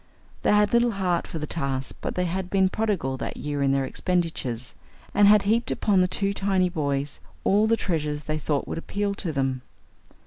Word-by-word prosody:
They -, -, +2 dB
had 210 Hz, +1 st, +4 dB
little 235 Hz, 0 st, +4 dB
heart 180 Hz, -3 st, 0 dB
for -, -, -5 dB
the 155 Hz, -, -3 dB
task, 135 Hz, -4 st, -3 dB
but -, -, -3 dB
they 180 Hz, -, 0 dB
had 180 Hz, +1 st, -3 dB
been 190 Hz, -1 st, +3 dB
prodigal 190 Hz, -11 st, -1 dB
that -, -, -5 dB
year 145 Hz, -1 st, -3 dB
in 135 Hz, -1 st, +3 dB
their 135 Hz, -1 st, +1 dB
expenditures, 160 Hz, -10 st, -2 dB, 0.4 s
and 205 Hz, 0 st, +6 dB
had 210 Hz, 0 st, +6 dB
heaped 225 Hz, +4 st, +1 dB
upon 200 Hz, -3 st, +2 dB
the 180 Hz, -, +3 dB
two 200 Hz, +2 st, 0 dB
tiny 195 Hz, -2 st, +1 dB
boys 145 Hz, -4 st, -2 dB, 0.2 s
all 210 Hz, +3 st, +3 dB
the 230 Hz, 0 st, +3 dB
treasures 150 Hz, -6 st, -2 dB
they 155 Hz, 0 st, -2 dB
thought 145 Hz, -1 st, -1 dB
would -, -, -3 dB
appeal 200 Hz, +3 st, -2 dB
to 185 Hz, -4 st, -3 dB
them. 135 Hz, -3 st, -1 dB
180 Hz, 200 wpm, -25 LUFS, 145-200 Hz, 0.4 s, and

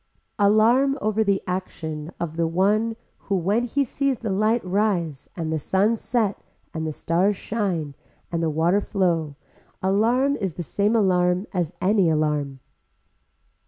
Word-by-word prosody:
Alarm 230 Hz, +7 st, +4 dB
over 215 Hz, +1 st, +1 dB
the 200 Hz, -2 st, +1 dB
action 160 Hz, -4 st, -4 dB
of 165 Hz, -2 st, -4 dB
the 165 Hz, 0 st, +1 dB
one 210 Hz, +7 st, +1 dB, 0.2 s
who 200 Hz, -, -2 dB
when 200 Hz, +7 st, +1 dB
he 280 Hz, +4 st, 0 dB
sees 275 Hz, +1 st, -1 dB
the 220 Hz, -3 st, -4 dB
light 215 Hz, +3 st, +1 dB
rise 180 Hz, -7 st, -1 dB
and 160 Hz, -2 st, -3 dB
the 160 Hz, -, 0 dB
sun 195 Hz, +9 st, +2 dB
set 220 Hz, -3 st, -1 dB, 0.3 s
and 160 Hz, 0 st, -3 dB
the -, -, -2 dB
stars 180 Hz, +7 st, +1 dB
shine 185 Hz, -9 st, -2 dB, 0.4 s
and 170 Hz, -1 st, -1 dB
the 165 Hz, -, +1 dB
water 165 Hz, +6 st, +2 dB
flow 170 Hz, -8 st, 0 dB, 0.4 s
alarm 235 Hz, +9 st, +2 dB
is 190 Hz, -, -3 dB
the 175 Hz, -, -4 dB
same 205 Hz, +7 st, 0 dB
alarm 180 Hz, -2 st, +2 dB
as 175 Hz, -2 st, -2 dB
any 195 Hz, -2 st, +3 dB
alarm. 150 Hz, -3 st, -1 dB
190 Hz, 150 wpm, -23 LUFS, 165-215 Hz, 0.4 s, Alarm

